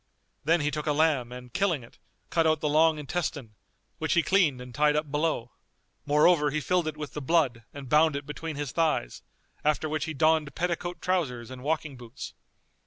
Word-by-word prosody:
Then 165 Hz, +2 st, +3 dB
he 145 Hz, 0 st, 0 dB
took 150 Hz, +2 st, -4 dB
a 150 Hz, -, +3 dB
lamb 145 Hz, -6 st, +2 dB
and 125 Hz, -1 st, -10 dB
killing 175 Hz, -9 st, +1 dB
it, 115 Hz, -, -17 dB, 0.3 s
cut 165 Hz, -1 st, +3 dB
out 155 Hz, -1 st, +2 dB
the 150 Hz, -, -1 dB
long 155 Hz, +1 st, +4 dB
intestine[FN#244] 150 Hz, -4 st, -3 dB, 0.5 s
which -, -, 0 dB
he 170 Hz, -, +3 dB
cleaned 170 Hz, -10 st, +3 dB
and 125 Hz, 0 st, -9 dB
tied 150 Hz, +2 st, +3 dB
up 150 Hz, -1 st, -1 dB
below; 145 Hz, -6 st, -1 dB, 0.6 s
moreover 150 Hz, +1 st, +4 dB
he 155 Hz, +2 st, -1 dB
filled 175 Hz, +2 st, 0 dB
it 155 Hz, -1 st, -4 dB
with 150 Hz, -2 st, -6 dB
the 150 Hz, -, -4 dB
blood 130 Hz, -6 st, +1 dB
and 140 Hz, -2 st, -9 dB
bound 150 Hz, +2 st, +4 dB
it 140 Hz, 0 st, -4 dB
between 155 Hz, +2 st, -5 dB
his 145 Hz, -2 st, -4 dB
thighs; 155 Hz, -, 0 dB, 0.4 s
after 150 Hz, +1 st, +1 dB
which 155 Hz, 0 st, -2 dB
he 160 Hz, -, -5 dB
donned 155 Hz, 0 st, +2 dB
petticoat 175 Hz, 0 st, -2 dB
trousers 130 Hz, -11 st, -1 dB
and 130 Hz, -1 st, -8 dB
walking 150 Hz, -1 st, -2 dB
boots. 120 Hz, +1 st, -9 dB
150 Hz, 195 wpm, -28 LUFS, 140-160 Hz, 0.6 s, long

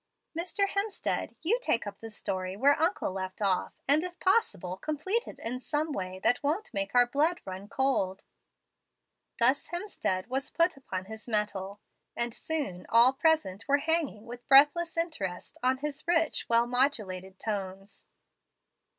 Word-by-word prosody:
Mr. 365 Hz, +4 st, 0 dB
Hemstead, 400 Hz, +1 st, -2 dB
you 440 Hz, +9 st, +2 dB
take 235 Hz, -, +1 dB
up 205 Hz, -1 st, -7 dB
the 225 Hz, -, -8 dB
story 190 Hz, -3 st, -4 dB
where 285 Hz, +6 st, +4 dB
uncle 335 Hz, -, +1 dB
left 185 Hz, 0 st, -5 dB
off, 195 Hz, -3 st, 0 dB
and, 295 Hz, +4 st, +5 dB
if 360 Hz, -1 st, -6 dB
possible, 370 Hz, -, +1 dB
complete 310 Hz, -, -2 dB
it -, -, -9 dB
in 250 Hz, +3 st, -4 dB
a 305 Hz, +1 st, +1 dB
way 185 Hz, -6 st, -4 dB
that 245 Hz, -, +3 dB
won't 310 Hz, +9 st, -1 dB
make 195 Hz, +3 st, -2 dB
our 245 Hz, 0 st, +7 dB
blood 305 Hz, +8 st, +1 dB
run 190 Hz, +1 st, -7 dB
cold." 205 Hz, -7 st, 0 dB, 1.1 s
Thus 255 Hz, +4 st, +3 dB
Hemstead 345 Hz, -, -2 dB
was 265 Hz, +3 st, -3 dB
put 335 Hz, +1 st, +2 dB
upon 190 Hz, -9 st, -5 dB
his 220 Hz, +3 st, -9 dB
mettle, 205 Hz, -2 st, -1 dB, 0.3 s
and 235 Hz, -1 st, -1 dB
soon 280 Hz, -, -2 dB
all 235 Hz, +3 st, +6 dB
present 270 Hz, -, +1 dB
were 285 Hz, 0 st, +4 dB
hanging 290 Hz, -8 st, -1 dB
with 240 Hz, +1 st, -10 dB
breathless 295 Hz, +5 st, +6 dB
interest 205 Hz, -, -3 dB
on 255 Hz, +1 st, +2 dB
his 295 Hz, +2 st, -5 dB
rich, 330 Hz, -2 st, +1 dB
well 235 Hz, 0 st, +4 dB
modulated 210 Hz, -8 st, 0 dB
tones. 195 Hz, -2 st, -4 dB
250 Hz, 150 wpm, -29 LUFS, 195-320 Hz, 1.1 s, our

